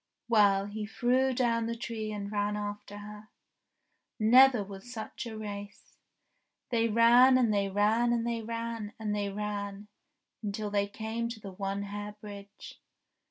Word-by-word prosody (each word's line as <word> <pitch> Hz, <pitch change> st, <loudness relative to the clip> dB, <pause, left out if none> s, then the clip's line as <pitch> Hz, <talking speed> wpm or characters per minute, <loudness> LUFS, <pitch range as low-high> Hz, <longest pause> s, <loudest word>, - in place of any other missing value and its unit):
Well, 200 Hz, -4 st, +4 dB
he 210 Hz, +1 st, -5 dB
threw 255 Hz, +4 st, +2 dB
down 235 Hz, -2 st, +1 dB
the 230 Hz, -, -2 dB
tree 220 Hz, -2 st, -4 dB
and 205 Hz, -1 st, -5 dB
ran 205 Hz, 0 st, 0 dB
after 205 Hz, 0 st, -6 dB
her. 210 Hz, +1 st, -10 dB, 0.9 s
Never 245 Hz, +1 st, +6 dB
was 195 Hz, +4 st, -10 dB
such 230 Hz, +1 st, -6 dB
a 220 Hz, -1 st, -7 dB
race. 205 Hz, -1 st, -8 dB, 0.7 s
They 230 Hz, -1 st, +2 dB
ran, 240 Hz, +4 st, +6 dB
and 235 Hz, -4 st, +3 dB
they 200 Hz, -1 st, +1 dB
ran, 215 Hz, +4 st, +2 dB
and 235 Hz, -1 st, +1 dB
they 235 Hz, -1 st, -1 dB
ran, 230 Hz, -1 st, -4 dB
and 210 Hz, -1 st, -2 dB
they 205 Hz, -1 st, -1 dB
ran, 205 Hz, 0 st, -4 dB, 0.5 s
until 210 Hz, 0 st, -3 dB
they 200 Hz, 0 st, +1 dB
came 220 Hz, +3 st, -4 dB
to 235 Hz, -2 st, -7 dB
the 200 Hz, -2 st, -8 dB
One 195 Hz, +1 st, -3 dB
Hair 205 Hz, +1 st, -6 dB
Bridge. 200 Hz, -1 st, -11 dB
210 Hz, 155 wpm, -30 LUFS, 205-230 Hz, 0.9 s, Never